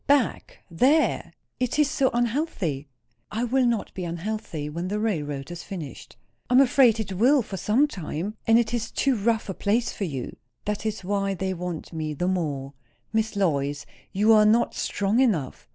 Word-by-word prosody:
"Back! 280 -4 +1
There? 270 - +2 0.3
It 250 +2 -1
is 300 0 +2
too 265 -2 +3
unhealthy." 230 - -1 0.4
"It 235 +2 -2
will 260 -1 +3
not 230 -3 -1
be 185 - -5
unhealthy, 170 -2 -4
when 170 +4 -4
the 205 +3 -2
railroad 150 -9 -2
is 175 0 -6
finished." 165 -8 -8 0.3
"I 250 - +3
am - - +8
afraid 250 -4 +5
it 195 -3 -3
will, 250 +7 +4
for 200 - -7
some 230 - +3
time. 185 - -4
And 225 0 +6
it 235 -1 +1
is 235 -2 -1
too 275 -2 +1
rough 225 +1 0
a 190 - -3
place 215 +6 0
for 200 - -3
you." 135 -7 -5 0.3
"That 210 +1 -2
is 210 -3 -4
why 195 +1 -1
they 190 +1 -2
want 175 -2 -5
me 155 -2 -3
the 175 +5 -1
more." 145 -7 -2 0.4
"Miss 220 -1 0
Lois, 145 -7 0 0.3
you 210 +3 +4
are 215 -1 +7
not 225 +3 +3
strong 205 +4 0
enough." 190 - 0
205 Hz, 185 wpm, -25 LUFS, 170-235 Hz, 0.4 s, am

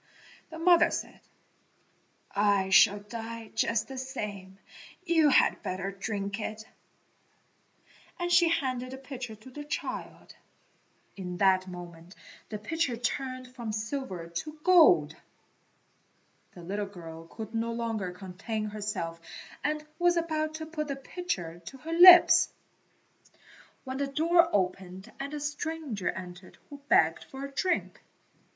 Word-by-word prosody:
The 320 - -9
mother 340 0 +5
said, - - -5 1.2
"I 200 -2 +2
shall 205 +1 +6
die 225 +1 -7
just 225 -1 0
the 265 -1 -6
same; 205 -8 -6 0.5
you 325 -4 +4
had - - +4
better 185 +1 -3
drink 200 +1 -4
it," 215 0 -5 1.5
and 350 -1 -2
she 345 -1 +6
handed 255 -6 -1
the - - -6
pitcher 255 -4 -7
to 215 +5 -15
the 295 +3 -7
child. 300 +3 -6 0.8
In 180 -2 -6
that 190 -1 +3
moment 175 0 -10 0.3
the 215 - -4
pitcher 255 +3 -1
turned 255 +2 -3
from 235 -4 -5
silver 215 -5 -4
to 170 - -5
gold. 365 0 +6 1.4
The 175 - -11
little 200 +3 -3
girl 165 -4 -10
could 220 +4 -8
no 230 +1 -1
longer 225 -5 -3
contain 195 +4 -5
herself 200 -6 -4 0.4
and 300 +1 -1
was 350 0 +3
about 310 -2 -1
to 315 0 -5
put 310 -1 -4
the 280 - -3
pitcher 190 - -5
to 270 - -8
her 320 +5 -6
lips, 355 +1 +9 1.3
when 260 -1 -5
the 280 0 -1
door 335 +5 +3
opened 190 +1 -2
and 275 +1 -4
a - - -4
stranger 295 - -3
entered 180 0 -8
who 285 - -9
begged 160 +1 +4
for 270 +1 -7
a 280 - -8
drink. 365 +6 -1
230 Hz, 130 wpm, -29 LUFS, 195-295 Hz, 1.5 s, lips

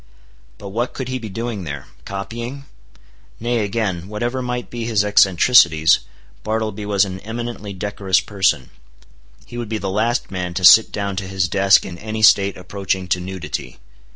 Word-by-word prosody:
But 100 - -9
what 120 +5 -2
could 130 -2 -5
he 130 0 -3
be 110 -3 -7
doing 115 0 -4
there?—copying? 100 - -7 0.7
Nay 120 +1 0
again, 100 -4 -2
whatever 120 +5 -3
might 125 -1 -4
be 120 -1 -4
his 110 -3 +1
eccentricities, 90 -5 +5 0.4
Bartleby 110 -1 -3
was 100 -1 +3
an 95 -1 -6
eminently 115 0 -6
decorous 100 0 0
person. 95 -11 0 0.7
He 120 - -8
would 115 -3 -5
be 110 - -1
the 95 -2 -3
last 115 +4 0
man 90 -2 -4
to 90 0 +1
sit 110 +5 +8
down 100 -2 -3
to 95 0 -3
his 95 -1 0
desk 95 +2 +4
in 85 -2 -8
any 110 0 -4
state 100 -2 +5
approaching 95 0 -3
to 90 - +1
nudity. 95 0 -6
100 Hz, 160 wpm, -20 LUFS, 95-115 Hz, 0.7 s, sit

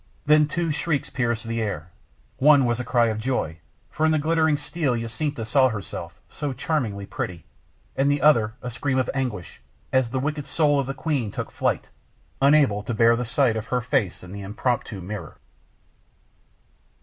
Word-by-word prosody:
Then 150 0 +5
two 170 0 -1
shrieks 150 -1 -1
pierced 120 -3 -1
the 115 0 -2
air. 90 -6 -4 0.5
One 145 -1 +6
was 120 0 0
a - - -2
cry 120 -1 +2
of 110 -1 -2
joy, 110 -10 -2 0.3
for 155 - -2
in 160 - +4
the 155 - +3
glittering 160 0 +2
steel 145 -2 -1
Jacinta 115 +2 -3
saw 130 +3 +4
herself, 105 -4 -6
so 145 -3 -4
charmingly 115 -10 -2
pretty 90 -4 -5 0.5
and 135 +1 +2
the 145 0 +2
other 115 -7 +4
a 125 - -4
scream 130 +3 -1
of 130 - +1
anguish, 125 -10 -4 0.3
as 130 -2 +3
the 130 - -2
wicked 145 +1 -3
soul 145 -1 +2
of 135 - -1
the 135 - -3
queen 135 -5 -1
took - - -5
flight, - - -1 0.5
unable 140 -7 +4
to 110 +2 -4
bear 115 +1 +5
the 125 +1 -2
sight 120 0 +2
of 110 +1 -4
her 125 - +1
face 120 -8 -1
in 90 - -10
the 100 +1 -7
impromptu 105 0 -2
mirror. 105 +4 -7
125 Hz, 180 wpm, -24 LUFS, 110-145 Hz, 0.5 s, One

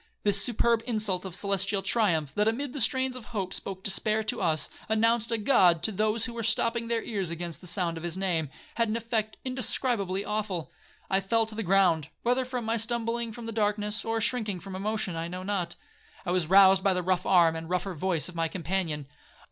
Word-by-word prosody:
This 200 -1 +4
superb 235 -1 +1
insult 210 -6 0
of 185 -2 -3
celestial 195 0 0
triumph, 175 -9 +1
that 210 +4 +1
amid 255 +4 -1
the 285 - 0
strains 260 -1 +3
of 250 -3 -9
hope 200 -6 -4
spoke 190 -1 -4
despair 215 +2 +1
to 215 - -2
us, 155 -4 +2 0.2
announced 230 +1 +2
a 230 - +1
God 180 -7 +4
to 220 - +3
those 215 +2 +1
who 235 - -5
were 235 - -4
stopping 230 +1 +1
their 230 -1 -1
ears 200 -6 -3
against 170 0 -6
the 180 - -10
sound 170 -2 -1
of 165 - -8
his 175 +1 -3
name, 170 -6 -1 0.3
had 230 -1 +1
an 220 - 0
effect 225 -2 -2
indescribably 240 -6 0
awful. 205 -8 -3 0.4
I 190 - +2
fell 225 +4 +1
to 220 - -8
the 220 - -4
ground, 180 -6 +3 0.2
whether 250 +2 +1
from 240 -3 -2
stumbling 230 0 -2
from 235 +1 -9
the 230 - -4
darkness, 210 0 0
or 225 0 -1
shrinking 215 -4 0
from 195 +1 -8
emotion, 210 -1 -1
I 165 0 -3
know 180 +2 -6
not. 185 -3 -2 0.5
I 175 - -1
was 180 -3 +1
roused 190 +1 +6
by 195 -2 +2
the 180 - -1
rough 185 0 0
arm, 170 -4 +5
and 160 0 -6
rougher 180 +1 -1
voice 170 -1 +1
of 180 - -7
my 165 -1 0
companion. 165 -3 -3
200 Hz, 210 wpm, -28 LUFS, 180-225 Hz, 0.5 s, roused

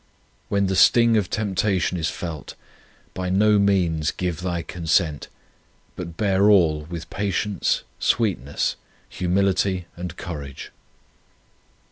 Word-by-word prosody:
When 100 0 +1
the 95 0 0
sting 115 +3 +5
of 100 -5 +1
temptation 100 -3 0
is 85 -1 -1
felt, 85 -5 -6 0.6
by 90 -1 -3
no 105 +2 +4
means 90 -6 +2
give 90 -2 -3
thy 85 -2 -2
consent, 80 -3 0 0.7
but 85 -2 -7
bear 100 -1 +3
all 80 -7 +4
with 85 0 -8
patience, 100 -1 -1 0.2
sweet 110 - +1
ness, 70 +3 -2 0.3
humility, 95 0 0
and 90 -1 -7
courage. 70 -6 -7
90 Hz, 115 wpm, -23 LUFS, 85-100 Hz, 0.7 s, sting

